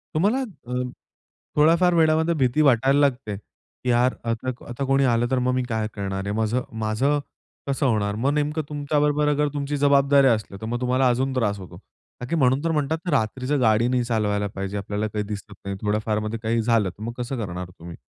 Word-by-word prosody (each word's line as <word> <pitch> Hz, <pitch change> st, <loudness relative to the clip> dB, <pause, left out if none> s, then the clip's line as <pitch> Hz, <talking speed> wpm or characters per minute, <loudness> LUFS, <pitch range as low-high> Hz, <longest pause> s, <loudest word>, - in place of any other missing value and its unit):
तुम्हाला 205 Hz, +11 st, +2 dB
अ, 200 Hz, -, -9 dB, 0.8 s
थोड्याफार 170 Hz, +4 st, +4 dB
वेळामध्ये 160 Hz, 0 st, +3 dB
भीती 130 Hz, 0 st, +2 dB
वाटायला 135 Hz, 0 st, +4 dB
लागते, 130 Hz, -7 st, +1 dB
की 125 Hz, +4 st, -10 dB
यार 125 Hz, +1 st, +3 dB, 0.2 s
आता 115 Hz, +3 st, -2 dB, 0.2 s
आता 120 Hz, +3 st, -4 dB
कोणी 135 Hz, +1 st, +3 dB
आलं 120 Hz, -1 st, +2 dB
तर 130 Hz, -, +2 dB
मग 125 Hz, -, +2 dB
मी 130 Hz, 0 st, 0 dB
काय 110 Hz, -1 st, -1 dB
करणार 95 Hz, -1 st, -3 dB
आहे? 100 Hz, -, -2 dB
माझं 110 Hz, +3 st, 0 dB, 0.2 s
माझं 115 Hz, +7 st, +1 dB, 0.5 s
कसं 140 Hz, +1 st, 0 dB
होणार? 105 Hz, -5 st, +1 dB
मग 130 Hz, +6 st, 0 dB
नेमकं 150 Hz, +1 st, 0 dB
तुमच्याबरोबर 150 Hz, 0 st, +1 dB
अगर 150 Hz, 0 st, +2 dB
तुमची 145 Hz, 0 st, -2 dB
जबाबदारी 140 Hz, -1 st, +4 dB
असली 110 Hz, -5 st, 0 dB
तर -, -, -4 dB
मग 120 Hz, +2 st, -3 dB
तुम्हाला 130 Hz, +1 st, +2 dB
अजून 130 Hz, +2 st, 0 dB
त्रास 105 Hz, -5 st, 0 dB
होतो. 95 Hz, -3 st, -10 dB, 0.4 s
ताकी 125 Hz, +7 st, -2 dB
म्हणून 135 Hz, -1 st, +2 dB
तर 165 Hz, -, +1 dB
म्हणतात 160 Hz, +3 st, -1 dB
रात्रीच 130 Hz, +1 st, -1 dB
गाडी 110 Hz, 0 st, +3 dB
नाही 125 Hz, 0 st, +1 dB
चालवायला 105 Hz, -3 st, 0 dB
पाहिजे 95 Hz, +1 st, -3 dB
आपल्याला 105 Hz, +2 st, -2 dB
काही 105 Hz, 0 st, -3 dB
दिसत 105 Hz, 0 st, -7 dB
नाही, 100 Hz, 0 st, -3 dB
थोड्याफारमध्ये 105 Hz, +1 st, -1 dB
काही 115 Hz, +1 st, +1 dB
झालं 115 Hz, -4 st, +2 dB
तर 95 Hz, +4 st, -11 dB
मग 115 Hz, +1 st, -4 dB
कसं 125 Hz, +2 st, -3 dB
करणार 90 Hz, -1 st, -6 dB
तुम्ही? 85 Hz, 0 st, -9 dB
125 Hz, 190 wpm, -24 LUFS, 110-145 Hz, 0.8 s, थोड्याफार